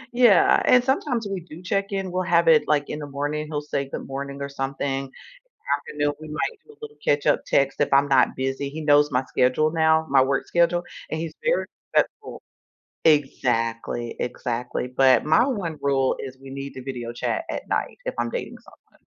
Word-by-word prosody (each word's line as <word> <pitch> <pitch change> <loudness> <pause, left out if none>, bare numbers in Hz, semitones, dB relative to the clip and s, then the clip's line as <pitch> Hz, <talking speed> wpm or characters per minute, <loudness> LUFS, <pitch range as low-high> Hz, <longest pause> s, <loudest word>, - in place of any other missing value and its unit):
Yeah, 235 -7 +5
and 250 -1 +5
sometimes 250 -4 0
we 195 -2 -3
do 170 0 -12
check-in, 195 -1 -2
we'll 185 +1 -1
have 170 -1 +2
it, 160 -2 +5
like, 145 -1 +1
in 150 - -5
the 145 - -6
morning, 145 +2 -3
he'll 150 -1 -3
say 140 -2 -3
"Good - - -6
morning" 140 +1 -6
or - - -3
something, 135 0 -3
in - - -13 0.5
the 450 - -3
afternoon 145 - 0
we 155 - -9
might 160 - -3
do 445 - -16
a - - -33
little 445 -1 -9
catch-up 145 0 +2
text 135 0 +1
if 145 - +1
I'm 140 +1 +5
not 135 -2 +3
busy, 135 +1 -2
he 155 +3 -7
knows 145 -1 +4
my 125 +1 0
schedule 130 +5 +1
now, 160 -1 +3
my 135 -1 +5
work 135 +1 0
schedule, 175 0 +2 0.3
and 155 - -2
he's 165 - -5
very - - +2 0.3
respectful. - - -1 0.7
Exactly, 120 -5 +1
exactly, 125 0 -3
but 130 0 +4
my 160 +10 +5
1 185 - -3
rule 135 -2 +2
is 130 -1 -7
we 135 0 -11
need 140 0 -7
to 130 - -8
video 125 -3 -5
chat 225 - -2
at - - -5
night - - -2
if - - -2
I'm - - 0
dating - - -5
someone. - - -22
145 Hz, 200 wpm, -24 LUFS, 135-170 Hz, 0.7 s, Yeah